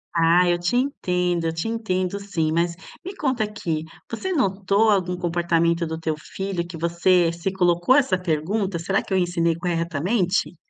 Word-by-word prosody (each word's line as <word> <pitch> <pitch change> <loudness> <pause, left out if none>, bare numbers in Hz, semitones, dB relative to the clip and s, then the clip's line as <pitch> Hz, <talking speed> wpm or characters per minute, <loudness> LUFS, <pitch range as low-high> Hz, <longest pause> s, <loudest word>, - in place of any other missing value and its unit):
Ah, 170 +2 +4
eu 175 - +2
te 175 +7 -1
entendo, 180 -10 0
eu 160 - 0
te 165 +6 -3
entendo 200 -4 -2
sim. 170 -6 -1
Mas, 170 +1 0 0.3
me 385 +2 -6
conta 260 - 0
aqui, 170 -7 -3 0.3
você 375 +12 -4
notou 200 - +2
algum 180 -3 +1
comportamento 170 -1 +1
do 160 0 -5
teu 160 -1 -1
filho 185 +2 -4
que 170 -2 -8
você 170 +1 +2
se 170 +3 -3
colocou 180 +4 +3
essa 270 -10 +3
pergunta: 180 +3 -1
"Será 190 +4 0
que - - -5
eu - - +3
ensinei 175 -2 +1
corretamente?"? 175 +3 -1
180 Hz, 170 wpm, -23 LUFS, 170-200 Hz, 0.3 s, Ah